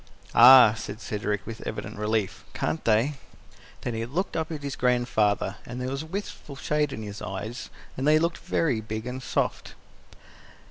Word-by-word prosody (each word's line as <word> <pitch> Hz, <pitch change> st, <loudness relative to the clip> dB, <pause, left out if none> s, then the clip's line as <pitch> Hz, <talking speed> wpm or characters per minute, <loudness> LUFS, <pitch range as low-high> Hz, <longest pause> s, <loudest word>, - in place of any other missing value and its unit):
"Ah!" 125 Hz, -2 st, +9 dB
said 105 Hz, -1 st, -7 dB
Cedric, 105 Hz, -3 st, -3 dB
with 115 Hz, -1 st, -7 dB
evident -, -, -5 dB
relief. 105 Hz, -2 st, -1 dB
"Can't 160 Hz, -, -2 dB
they?" 115 Hz, +6 st, +2 dB, 0.6 s
Then 120 Hz, -, -3 dB
he 115 Hz, 0 st, -2 dB
looked 175 Hz, +10 st, -2 dB
up 160 Hz, 0 st, -2 dB
at 150 Hz, -3 st, -5 dB
his 140 Hz, -1 st, -3 dB
grandfather, 110 Hz, -5 st, +1 dB
and 125 Hz, +1 st, -7 dB
there 125 Hz, 0 st, -3 dB
was 135 Hz, +1 st, -3 dB
a 160 Hz, -, -8 dB
wistful 180 Hz, -5 st, -6 dB
shade 150 Hz, +1 st, 0 dB
in 110 Hz, -, -6 dB
his 105 Hz, -1 st, -7 dB
eyes, 105 Hz, +6 st, -5 dB, 0.3 s
and 135 Hz, +2 st, -1 dB
they 155 Hz, +1 st, +6 dB
looked 165 Hz, +1 st, 0 dB
very 130 Hz, -10 st, 0 dB
big 110 Hz, +1 st, -5 dB
and 125 Hz, +1 st, -5 dB
soft. -, -, -2 dB
125 Hz, 175 wpm, -26 LUFS, 110-145 Hz, 0.6 s, Ah